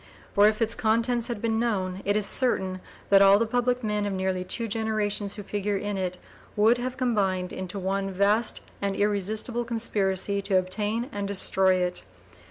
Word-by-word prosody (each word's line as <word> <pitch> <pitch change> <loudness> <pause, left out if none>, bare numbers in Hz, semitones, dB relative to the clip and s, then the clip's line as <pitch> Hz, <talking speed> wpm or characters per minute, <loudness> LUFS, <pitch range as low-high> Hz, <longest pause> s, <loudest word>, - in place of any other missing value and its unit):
For 205 0 +6
if 215 +2 +1
its 225 +1 +1
contents 230 +2 +1
had 235 -4 -5
been 225 -1 +1
known, 190 -5 -1
it 205 +1 +2
is 210 -1 +2
certain 190 -6 +1 0.3
that 195 0 +7
all 195 0 +7
the 230 - +1
public 245 +2 0
men 210 -1 -1
of 200 - -2
nearly 190 -1 -1
two 225 +5 -3
generations 210 -2 -1
who 205 - -7
figure 205 0 -2
in 205 +1 -3
it 185 -1 -3 0.4
would 225 +4 +4
have 255 +1 -4
combined 195 -7 0
into 185 +1 -5
one 195 +1 -2
vast 200 +4 +1 0.2
and 200 -1 -1
irresistible 210 +4 -1
conspiracy 200 -4 -1
to 195 -1 +1
obtain 210 +5 -1
and 200 -1 -3
destroy 190 -1 +2
it. 180 -1 -1
205 Hz, 180 wpm, -26 LUFS, 190-225 Hz, 0.4 s, that